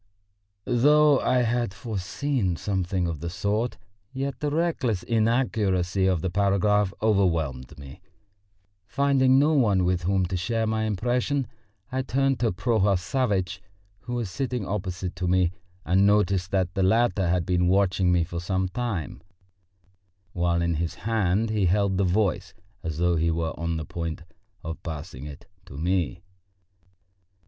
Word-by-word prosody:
Though 145 +3 +4
I 125 -1 +2
had 120 -3 -1
foreseen 105 0 -2
something 95 0 -1
of 80 -3 -4
the 85 - -4
sort, 105 +6 -1 0.3
yet 135 +1 -4
the 150 - -1
reckless 145 - 0
inaccuracy 105 -6 +1
of 90 -4 +1
the 95 - -1
paragraph 100 +1 +2
overwhelmed 80 - 0
me. 70 +5 -11 0.9
Finding 135 +1 +3
no 150 +3 +4
one 105 -10 +3
with 90 -1 +1
whom 95 +2 +1
to 95 +1 -3
share 110 +6 -1
my 110 0 0
impression, 125 +6 0 0.5
I 130 +1 0
turned 135 0 0
to 120 -2 +1
Prohor 100 +1 +1
Savvitch 95 -3 -1 0.4
who 120 +1 -6
was 115 -6 -3
sitting 125 -4 -3
opposite 95 -2 -4
to 90 - -2
me, 90 -1 +2 0.3
and 95 +3 +3
noticed 100 -3 +2
that 95 -3 0
the 95 - -1
latter 95 -2 +2
had 90 -1 +1
been 90 0 +1
watching 95 -1 +2
me 90 -1 +3
for 85 +1 -5
some 95 +1 -1
time, 100 - -4 1.1
while 85 -1 +1
in 85 0 +1
his 85 +1 -2
hand 110 +1 0
he 105 -4 +1
held 95 +1 +1
the - - +3
Voice 95 -2 0 0.3
as 80 -4 -4
though 85 0 +2
he 80 +1 +1
were 80 -1 -1
on 85 0 -2
the 80 - -4
point 85 +1 -5 0.4
of 80 0 -6
passing 75 -4 -7
it 70 -1 -11 0.2
to 70 - -10
me. 85 -3 -1
95 Hz, 150 wpm, -25 LUFS, 90-115 Hz, 1.1 s, Though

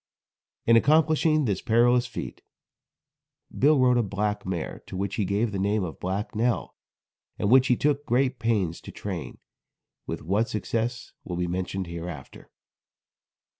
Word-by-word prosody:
In 115 - +5
accomplishing 155 +3 +4
this 100 -5 -1
perilous 120 +2 +3
feat, 115 - -7 1.1
Bill 150 +2 +4
rode 125 -1 +4
a - - +4
black 105 -1 -2
mare, 90 -4 -4
to 95 - -6
which 100 0 -2
he 105 - 0
gave 105 +4 0
the 100 - -3
name 100 +1 +1
of 85 -3 -6
Black 95 +3 -3
Nell, 115 +2 0 0.6
and 100 - 0
which 130 0 +6
he 125 - +4
took 145 +2 +1
great 130 +1 +1
pains 100 -8 0
to - - -10
train, - - -6 0.7
with - - -5
what 100 +7 +1
success 115 +2 -3
will 90 - -5
be 90 - 0
mentioned 90 +2 -3
hereafter. 85 -4 -8
110 Hz, 150 wpm, -26 LUFS, 95-125 Hz, 1.1 s, which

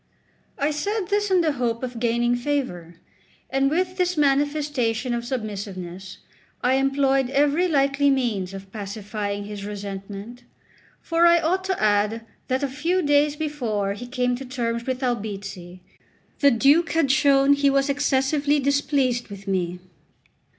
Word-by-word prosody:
I 290 +2 +1
said 400 +7 -2
this 410 0 +1
in 370 -2 +4
the 320 -2 +2
hope 245 -3 -2
of 245 -2 -4
gaining 240 +1 +1
favour; 240 - -3 0.6
and 270 0 +2
with 365 +4 -1
this 360 -2 0
manifestation 280 -4 +1
of 235 0 -2
submissiveness 195 -6 -6 0.5
I 250 +1 +3
employed 270 -1 +2
every 290 +6 +2
likely 280 -2 +2
means 215 -9 -1
of 195 0 -10
pacifying 205 0 -4
his 205 -1 -7
resentment; 205 +3 -7 0.6
for 335 +1 +3
I 340 0 +6
ought 355 +4 0
to 380 -1 -1
add 210 +2 +1 0.2
that 260 +2 -1
a - - +2
few 330 +7 -1
days 290 0 +3
before 240 -10 -2
he 245 +5 -8
came 250 -1 0
to 270 - -7
terms 235 -2 -3
with 260 0 -2
Albizzi, 200 -6 -4 0.6
the 280 - +6
Duke 280 +7 +3
had 325 -5 +2
shown 275 0 +4
he 285 0 +3
was 275 0 +2
excessively 285 +1 +1
displeased 275 -3 +1
with 200 -1 -11
me. 180 -2 -1
260 Hz, 145 wpm, -23 LUFS, 210-290 Hz, 0.6 s, I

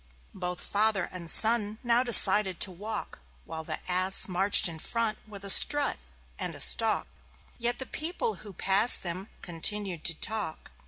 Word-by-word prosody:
Both 180 -1 -7
Father 205 -2 -2
and 175 -2 -7
Son 220 +1 +3
now 240 0 +1
decided 210 -6 +5
to 190 - +3
walk, 210 +4 -8 0.3
While 160 0 -9
the - - -7
Ass 185 +1 +4
marched 190 +2 +1
in 165 -2 -11
front 230 +3 -5
with 200 -2 -11
a - - -4
strut 290 +6 +4 0.4
and - - -5
a - - -6
stalk; - - +1 0.5
Yet 240 +1 -2
the 265 - -7
people 355 - -4
who 205 - -12
passed 195 +5 +2
them 185 +3 -7
continued 180 0 -4
to 165 - +2
talk. 205 -3 -4
200 Hz, 160 wpm, -25 LUFS, 180-225 Hz, 0.5 s, decided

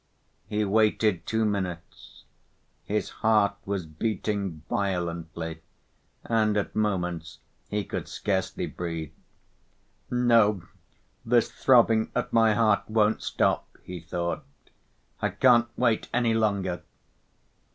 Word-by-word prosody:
He 105 0 0
waited 105 -3 +2
two 110 0 +1
minutes. 95 -5 -5 0.6
His 105 +3 -2
heart 105 -2 +4
was 100 -3 -2
beating 95 0 -3
violently, 85 -4 -3 0.6
and, 110 -2 +1
at 100 - -2
moments, 90 -6 -1 0.3
he 105 0 -1
could - - -5
scarcely 95 -2 -2
breathe. 85 -3 -5 1.0
"No, 115 -6 +3 0.6
this 120 0 +2
throbbing 115 -3 +4
at - - -2
my 115 -2 +4
heart 105 -2 +2
won't 110 0 +2
stop," - - 0 0.2
he 90 -1 -7
thought. 85 - -3 0.8
"I - - +1
can't 120 -2 +4
wait 120 -3 +1
any 120 -2 +2
longer." 100 -5 0
105 Hz, 105 wpm, -27 LUFS, 90-110 Hz, 1.0 s, heart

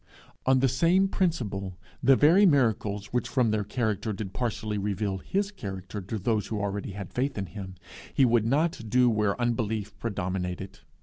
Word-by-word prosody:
On 130 -1 +4
the 135 - +4
same 170 +9 +3
principle, 105 - -1 0.2
the 135 +2 +6
very 165 +9 +6
miracles 110 - +2
which 125 - 0
from 125 -5 +2
their 105 -1 0
character 110 0 -1
did 95 -1 -6
partially 110 -2 -2
reveal 100 -1 -2
his 200 - -1
character 95 - -6
to 100 +4 -4
those 105 0 0
who 110 - -3
already 100 -1 -3
had 100 -2 -7
faith 135 +1 -1
in 100 - -2
him, 95 0 -8 0.4
he 135 - +4
would 115 -2 +3
not 140 -3 0
do 125 +1 +4
where 105 0 0
unbelief 110 -4 -1
predominated. 95 -3 -3
110 Hz, 170 wpm, -27 LUFS, 100-130 Hz, 0.4 s, the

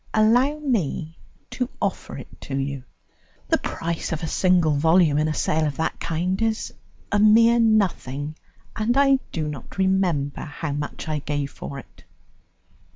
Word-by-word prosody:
"Allow 245 +7 +4
me 180 - -1 0.4
to 250 -1 -2
offer 200 -2 -3
it 130 - -12
to 135 - -4
you. 135 -1 -3 0.6
The - - +3
price 165 0 -3
of 160 +1 -3
a - - -1
single 180 -2 +3
volume 160 +1 +4
in 155 - +2
a 155 - -1
sale 155 0 +1
of 145 - -4
that 160 - -2
kind 180 +5 -1
is 225 0 -1 0.4
a 205 - +2
mere 230 +3 +6
nothing, 165 - +1 0.4
and 230 +4 0
I 275 -1 +5
do 155 -2 -2
not 145 +1 -8
remember 185 -7 +1
how 150 +1 -5
much 145 +2 -5
I 155 -1 -1
gave 145 -1 -3
for 140 - -7
it." 135 - -13
165 Hz, 160 wpm, -23 LUFS, 145-215 Hz, 0.6 s, mere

